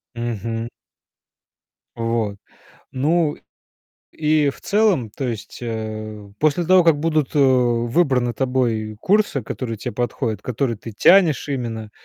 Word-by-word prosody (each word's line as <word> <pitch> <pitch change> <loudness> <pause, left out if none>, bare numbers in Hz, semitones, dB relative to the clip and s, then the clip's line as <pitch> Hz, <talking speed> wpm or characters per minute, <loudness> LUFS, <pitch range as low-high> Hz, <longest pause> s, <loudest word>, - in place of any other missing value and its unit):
Мгм. 115 0 -3 1.3
Вот. 115 -3 -1 0.6
Ну, 150 +3 +1 0.8
и 150 -2 +2
в - - -14
целом 200 - +2
То 135 - -6
есть, 110 -3 -6
э, 110 -2 -5
после 155 +3 +2
того, 185 0 +5
как 165 -3 +5
будут, 155 -2 0
э, - - +2
выбраны 125 0 +2
тобой 115 -4 -1
курсы, 205 -9 +2
которые 115 -4 -5
те - - -5
подходят, 115 -2 -2
которые 120 -1 -2
ты 115 +2 -9
тянешь 170 - +4
именно, 115 -5 -4
125 Hz, 120 wpm, -21 LUFS, 115-150 Hz, 1.3 s, того